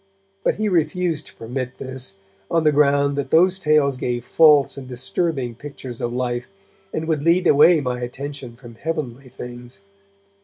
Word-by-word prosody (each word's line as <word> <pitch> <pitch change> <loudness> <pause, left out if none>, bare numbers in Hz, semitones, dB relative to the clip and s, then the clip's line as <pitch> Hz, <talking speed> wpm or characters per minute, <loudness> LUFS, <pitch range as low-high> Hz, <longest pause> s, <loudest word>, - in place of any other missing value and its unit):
But - - +2
he 215 0 -1
refused 170 -2 0
to - - -14
permit 125 +2 -5
this, 130 -6 -6 0.3
on 165 -1 +2
the 155 - +4
ground 140 -1 +3
that 140 -1 -3
those 180 +5 +4
tales 150 -5 +3
gave 120 -2 -2
false 150 -4 +5
and 135 -2 -8
disturbing 130 +1 -2
pictures 130 -1 -9
of 120 - -1
life, 120 0 -2 0.4
and 160 0 -3
would 155 -3 0
lead 170 +4 +3
away 155 +2 +6
my 125 -2 -2
attention 130 0 -6
from 120 -1 -13
heavenly 135 -2 -5
things. 120 +3 -10
140 Hz, 160 wpm, -22 LUFS, 125-155 Hz, 0.4 s, away